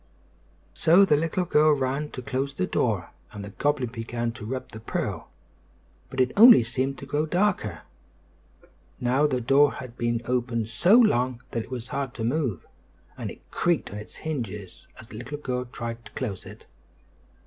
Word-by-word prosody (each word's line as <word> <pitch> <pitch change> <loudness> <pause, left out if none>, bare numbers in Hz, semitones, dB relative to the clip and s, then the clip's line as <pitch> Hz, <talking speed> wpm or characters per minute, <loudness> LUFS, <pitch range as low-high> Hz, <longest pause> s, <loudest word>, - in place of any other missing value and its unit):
So 175 +5 +5
the 150 - +4
little 165 +4 0
girl 155 -2 +4
ran 135 +2 -1
to 130 - -8
close 135 +3 -2
the 90 - 0
door, - - -1 0.2
and 105 -1 -7
the 100 - -9
goblin 135 0 0
began 115 0 -3
to 110 -2 -9
rub 130 +2 -4
the 110 - -9
pearl; 110 - -4 0.8
but 130 - -6
it 130 0 +3
only 225 - +9
seemed 130 +4 -2
to - - -8
grow 145 +3 -1
darker. 175 - 0 1.2
Now 130 +4 +2
the 130 -3 0
door 135 +4 +4
had 125 -2 -9
been 120 0 0
open 120 -2 0
so 115 - +4
long 125 - +3
that 115 - -1
it - - -18
was 125 -2 -6
hard 135 -3 -3
to 115 - -4
move, 120 - -1 0.5
and - - -5
it - - -11
creaked 170 -8 0
on 105 - -6
its 105 - -10
hinges 110 - -6
as 110 - -13
the 110 - -9
little 125 +6 -6
girl 125 -3 -3
tried 120 -1 -6
to - - -12
close 115 -9 -4
it. - - -12
130 Hz, 180 wpm, -26 LUFS, 115-145 Hz, 1.2 s, only